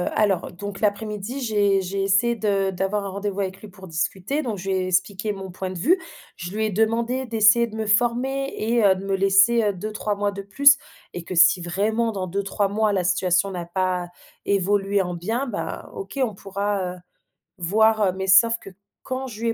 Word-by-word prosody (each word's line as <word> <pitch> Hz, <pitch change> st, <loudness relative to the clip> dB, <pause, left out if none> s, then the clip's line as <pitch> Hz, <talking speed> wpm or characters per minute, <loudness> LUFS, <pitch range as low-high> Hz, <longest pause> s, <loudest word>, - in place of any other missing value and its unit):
alors 195 Hz, -5 st, +1 dB
donc 195 Hz, +2 st, -7 dB
l'après-midi 210 Hz, +4 st, -2 dB
j'ai 205 Hz, -5 st, +2 dB
j'ai 195 Hz, +2 st, -3 dB
essayé 200 Hz, +5 st, +2 dB
de 200 Hz, -3 st, 0 dB
d'avoir 195 Hz, +2 st, -2 dB
un -, -, -4 dB
rendez-vous 200 Hz, +1 st, -3 dB
avec 190 Hz, 0 st, -4 dB
lui 215 Hz, -, -10 dB
pour 190 Hz, -1 st, -13 dB
discuter 190 Hz, -, -2 dB
donc, 230 Hz, -8 st, -4 dB
je 190 Hz, +1 st, -6 dB
lui 190 Hz, -, +1 dB
ai 185 Hz, 0 st, -1 dB
expliqué 200 Hz, +3 st, -1 dB
mon 190 Hz, -1 st, -8 dB
point 185 Hz, +1 st, -5 dB
de 185 Hz, -, -6 dB
vue. 345 Hz, -, +3 dB, 0.4 s
Je 175 Hz, +1 st, -7 dB
lui 220 Hz, 0 st, 0 dB
ai 215 Hz, -, -1 dB
demandé 230 Hz, +5 st, 0 dB
d'essayer 225 Hz, +1 st, +4 dB
de 220 Hz, -, -10 dB
me 220 Hz, 0 st, -3 dB
former 245 Hz, +5 st, +1 dB
et 230 Hz, +1 st, +1 dB
heu, 190 Hz, -2 st, +5 dB
de 190 Hz, +1 st, -7 dB
me 195 Hz, 0 st, 0 dB
laisser, 195 Hz, +4 st, +4 dB
heu, 205 Hz, -, +2 dB
2-3 210 Hz, +2 st, -3 dB
mois 205 Hz, 0 st, -1 dB
de 200 Hz, -, -6 dB
plus 275 Hz, +8 st, +5 dB, 0.4 s
et 175 Hz, -, -6 dB
que 185 Hz, -, -6 dB
si 180 Hz, +1 st, +5 dB
vraiment 215 Hz, +6 st, 0 dB
dans 190 Hz, -3 st, -3 dB
2-3 195 Hz, +2 st, -1 dB
mois 215 Hz, +1 st, +1 dB
la 190 Hz, -3 st, 0 dB
situation 180 Hz, +1 st, +1 dB
n'a 175 Hz, -2 st, -5 dB
pas 180 Hz, 0 st, -2 dB, 0.4 s
évolué 200 Hz, 0 st, +1 dB
en 180 Hz, -1 st, -4 dB
bien, 225 Hz, +10 st, -2 dB
ben 225 Hz, -5 st, -5 dB
OK, 195 Hz, +8 st, -7 dB
on 220 Hz, -4 st, -1 dB
pourra, 195 Hz, -1 st, -3 dB
heu, -, -, -14 dB, 0.6 s
voir, 215 Hz, +5 st, +2 dB
heu, 185 Hz, -, +2 dB
mais 190 Hz, 0 st, -4 dB
sauf 230 Hz, +5 st, +6 dB
que -, -, -11 dB, 0.3 s
quand 260 Hz, +1 st, -4 dB
je 220 Hz, -2 st, -9 dB
lui 230 Hz, -, +1 dB
ai -, -, 0 dB
200 Hz, 210 wpm, -23 LUFS, 190-220 Hz, 0.6 s, sauf